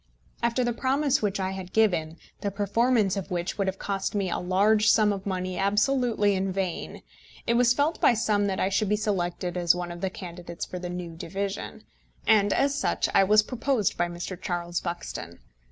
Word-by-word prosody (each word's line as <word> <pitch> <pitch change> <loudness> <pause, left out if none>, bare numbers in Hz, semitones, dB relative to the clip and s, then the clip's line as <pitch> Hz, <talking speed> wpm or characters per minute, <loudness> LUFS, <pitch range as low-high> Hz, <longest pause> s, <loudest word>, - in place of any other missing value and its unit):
After 235 +2 +1
the 240 0 0
promise 275 +3 +1
which 205 -2 -1
I 190 0 -1
had 190 -1 -7
given, 175 -7 +2 0.2
the 200 - -2
performance 205 +1 +1
of 195 -1 -4
which 175 +2 -3
would 195 - +1
have 190 0 -2
cost 195 +1 -3
me 195 -3 0
a - - -1
large 210 +4 +3
sum 215 -2 +4
of 195 0 -6
money 185 -1 -2
absolutely 210 +1 +2
in 190 0 -1
vain, 185 -2 -4 0.4
it 235 - +2
was 240 0 +4
felt 300 +4 0
by 240 - +5
some 210 -2 +1
that 190 -1 -2
I - - +2
should 200 +1 0
be 210 - +3
selected 180 -4 -2
as 175 -1 +3
one 175 -1 -4
of 175 0 -8
the 190 - 0
candidates 175 -2 -7
for 180 - -6
the 180 0 -5
new 175 -2 -6
division, 195 +4 -5 0.4
and 205 -2 +4
as 280 0 +2
such 285 - 0
I - - +6
was 210 +2 +5
proposed 245 -2 0
by 175 - 0
Mr. 175 +1 -6
Charles 175 -2 -2
Buxton. 170 - -6
195 Hz, 200 wpm, -26 LUFS, 180-215 Hz, 0.4 s, I